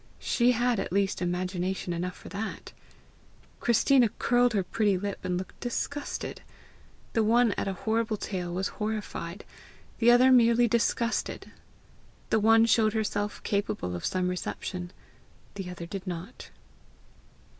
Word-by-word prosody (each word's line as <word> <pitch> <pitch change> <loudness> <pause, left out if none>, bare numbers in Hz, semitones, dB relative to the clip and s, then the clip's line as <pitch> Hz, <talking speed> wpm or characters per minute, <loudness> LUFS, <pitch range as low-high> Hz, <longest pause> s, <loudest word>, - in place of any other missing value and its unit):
She 245 0 +2
had 240 -1 +1
at - - -3
least 195 0 0
imagination 180 0 -2
enough 180 +2 -3
for - - -13
that! 210 +3 -5 0.9
Christina 240 +1 +4
curled 245 0 +3
her 200 -3 +1
pretty 205 0 +1
lip, 200 +1 -4
and 180 -1 -1
looked 185 - -7
disgusted. 285 +4 -4 0.7
The 225 - +2
one 230 +1 +4
at 200 - -2
a 195 - -1
horrible 220 +3 -1
tale 180 -4 -4
was 190 +3 -1
horrified, 210 -4 -5 0.5
the 235 - +5
other 250 +2 +7
merely 240 -1 +5
disgusted! 235 +1 -1 0.8
The 220 - +4
one 225 +1 +5
showed 220 -2 +3
herself 210 -1 -2
capable 200 - -2
of 85 - -6
some 185 -1 0
reception; 180 0 -4 0.6
the 195 -3 -6
other 175 -1 -7
did 190 +2 -7
not. 175 0 -7
205 Hz, 135 wpm, -28 LUFS, 185-230 Hz, 0.9 s, other